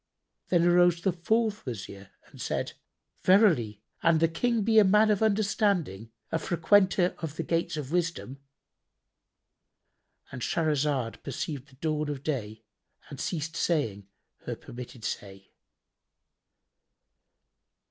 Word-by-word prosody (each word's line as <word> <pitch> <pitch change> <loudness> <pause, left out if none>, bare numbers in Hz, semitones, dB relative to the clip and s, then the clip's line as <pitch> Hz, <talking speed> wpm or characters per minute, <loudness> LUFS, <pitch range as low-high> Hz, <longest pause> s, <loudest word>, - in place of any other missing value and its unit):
Then 175 -2 +3
arose 175 -1 +4
the 190 - +3
fourth 220 +5 0
Wazir 100 -5 -7 0.2
and - - -14
said, - - -2 0.5
"Verily, 155 - +3 0.2
an 165 -1 +4
the 165 +1 +3
King 225 +7 0
be 220 +1 +5
a - - +7
man 210 +3 +4
of 205 - +1
understanding, 200 - 0 0.2
a 165 - 0
frequenter 185 +2 +3
of 160 -3 -5
the 165 - -3
gates 165 -1 -1
of 145 -2 -5
wisdom,"—And 140 -5 -9
Shahrazad 145 -6 0
perceived 140 0 -5
the 135 - -20
dawn 155 +1 -2
of 140 -2 -5
day 110 -7 -4 0.5
and 140 - -8
ceased 165 -1 -3
saying 110 - -1 0.4
her - - -3
permitted 120 -1 -10
say. 95 -1 -6
160 Hz, 115 wpm, -28 LUFS, 130-185 Hz, 0.5 s, a